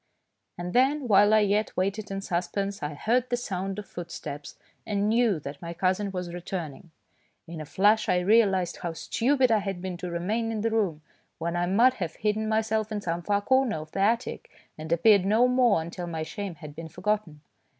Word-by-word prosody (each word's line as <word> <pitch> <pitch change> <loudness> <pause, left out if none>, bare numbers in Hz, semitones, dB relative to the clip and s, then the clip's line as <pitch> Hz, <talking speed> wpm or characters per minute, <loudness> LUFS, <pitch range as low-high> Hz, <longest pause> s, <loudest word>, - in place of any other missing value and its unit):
And 175 +1 -5
then, 270 +2 +2
while 205 -1 +6
I 215 0 +6
yet 210 +1 0
waited 195 +3 -1
in 195 0 -4
suspense, 195 +2 -2
I 150 0 -4
heard 240 - +1
the 245 - +1
sound 195 -4 -4
of 210 - -6
footsteps 165 -4 -7 0.3
and 205 -1 -1
knew 225 -5 +2
that 140 0 -8
my 170 0 -6
cousin 190 +3 0
was 180 -2 -5
returning. 175 -3 -6 0.6
In 165 -1 -7
a 155 - -8
flash 210 +5 +3
I - - +3
realised 190 -3 +3
how 170 -1 -4
stupid 255 - +1
I 220 - +4
had 195 -2 -4
been 180 -1 -5
to 180 0 -5
remain 210 +7 -1
in 220 -2 -2
the 225 +1 0
room, 190 -9 0 0.3
when 170 +1 -3
I 175 0 0
might 235 +8 +4
have 165 -2 -3
hidden 215 +1 -1
myself 220 0 0
in 210 - -2
some 170 -3 -3
far 200 +3 0
corner 260 0 +2
of 155 0 -8
the - - -4
attic 230 +5 0 0.3
and 155 +1 -8
appeared 190 +4 +5
no 220 +6 +4
more 245 -9 +3
until 175 +1 -6
my 160 -2 -3
shame 195 +2 -5
had 150 -1 -10
been 165 0 -7
forgotten. 180 -3 -2
195 Hz, 200 wpm, -27 LUFS, 170-220 Hz, 0.6 s, while